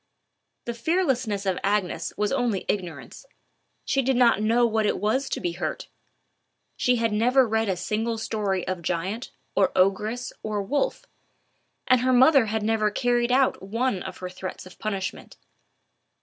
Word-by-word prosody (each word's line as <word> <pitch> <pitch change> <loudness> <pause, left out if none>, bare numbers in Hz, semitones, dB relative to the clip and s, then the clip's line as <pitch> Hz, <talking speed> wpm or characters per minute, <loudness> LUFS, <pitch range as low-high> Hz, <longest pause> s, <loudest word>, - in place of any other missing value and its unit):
The 235 - -3
fearlessness 250 - 0
of 190 -2 0
Agnes 190 -5 0
was 210 0 0
only 245 -7 0
ignorance: 180 -5 -4 0.6
she 275 - +1
did 265 0 +1
not 235 -4 +4
know 230 +3 +3
what 220 -2 +1
it - - 0
was 255 +6 0
to - - -2
be 175 -3 -2
hurt; 170 - -4 0.9
she 250 - +2
had 230 -2 0
never 250 +4 +4
read 220 -1 0
a 185 - 0
single 220 +5 -2
story 205 -4 -2
of 185 -2 -3
giant, 185 +8 -3 0.2
or 195 - +3
ogress 210 +6 +1
or 210 -2 -2
wolf; 290 - -1 0.8
and 255 -1 +4
her 255 +1 +2
mother 260 -1 +6
had 220 0 -1
never 215 -1 +2
carried 240 +2 +1
out 260 +1 +2
one 220 +1 -1
of 190 -1 -7
her 185 - -6
threats 185 0 -7
of 185 - -14
punishment. 195 -4 -4
220 Hz, 160 wpm, -25 LUFS, 195-245 Hz, 0.9 s, mother